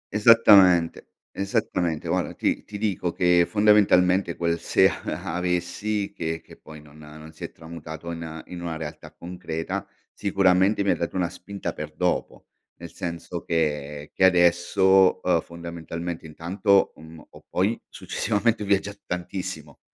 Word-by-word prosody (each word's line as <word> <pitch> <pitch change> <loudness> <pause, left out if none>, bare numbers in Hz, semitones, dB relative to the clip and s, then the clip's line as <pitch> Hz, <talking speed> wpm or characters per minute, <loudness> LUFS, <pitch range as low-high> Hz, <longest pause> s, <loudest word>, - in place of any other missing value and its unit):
Esattamente, 100 -6 +6 0.2
esattamente. 95 -6 -2
Guarda - - -1
ti - - -1
ti 105 - -8
dico 100 -5 -1
che 90 -1 +3
fondamentalmente, 100 -4 +3
quel 85 -1 -1
se - - +4
a - - -5
avessi, 90 +4 -2
che 80 0 -3
che - - -16
poi 80 0 -13
non 75 +1 -17
non 75 +1 -12
si 80 - -12
è - - -5
tramutato 80 0 -9
in 80 -1 -7
in 90 -1 -8
una 85 -2 -4
realtà 75 -2 -8
concreta, 85 -2 -5 0.3
sicuramente 95 0 +2
mi 100 - +2
ha - - +2
dato 85 - -4
una 90 -2 0
spinta 100 +2 -6
per 75 0 -7
dopo. 90 +1 -2 0.3
Nel 85 -1 -11
senso 85 0 -5
che 75 -2 -2
che - - 0
adesso, 95 +2 +4
uhm, 85 -3 +2
fondamentalmente 85 0 -7
intanto, 95 +5 +1
mhmm, 80 0 -13
ho - - -15
poi 100 +6 0
successivamente 110 0 -1
viaggiato 100 0 0
tantissimo. 90 -4 -5
90 Hz, 140 wpm, -24 LUFS, 80-95 Hz, 0.3 s, Esattamente